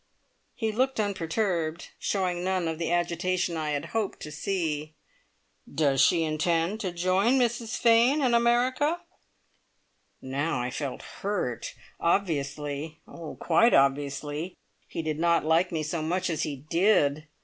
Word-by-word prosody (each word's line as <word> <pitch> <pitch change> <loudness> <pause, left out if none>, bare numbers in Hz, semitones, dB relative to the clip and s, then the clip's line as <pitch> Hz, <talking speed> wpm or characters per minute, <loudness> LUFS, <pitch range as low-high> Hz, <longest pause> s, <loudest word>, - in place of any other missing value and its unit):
He 220 -3 -1
looked 260 +3 0
unperturbed. 175 -4 -1
Showed 185 -3 0
none 185 -1 -1
of 160 0 -3
the 165 0 -1
agitation 175 +1 0
I 155 -1 -2
had 145 -1 -2
hoped 220 -3 -1
to 150 - -7
see. 155 -3 -2 0.8
"Does 140 -3 +2
she 165 +4 +4
intend 165 +5 0
to 190 -5 -2
join 185 +7 +2
Mrs 240 -2 0
Fane 235 +5 +4
in 255 -4 +2
America?" 255 +7 +2 1.2
Now 135 +2 -2
I 125 +1 -2
felt 140 -2 -4 0.2
hurt! 180 - -2 0.2
Obviously, 150 -3 -1
oh, 165 -2 -8
quite 230 +8 +4
obviously, 145 +4 0 0.3
he 165 - -4
did 155 -1 -2
not 170 -1 +2
like 165 +3 +3
me 160 -2 -1
so 155 +2 -2
much 180 +3 -1
as 155 - -2
he 145 -2 -4
did! 155 -5 +3
170 Hz, 140 wpm, -27 LUFS, 155-200 Hz, 1.2 s, she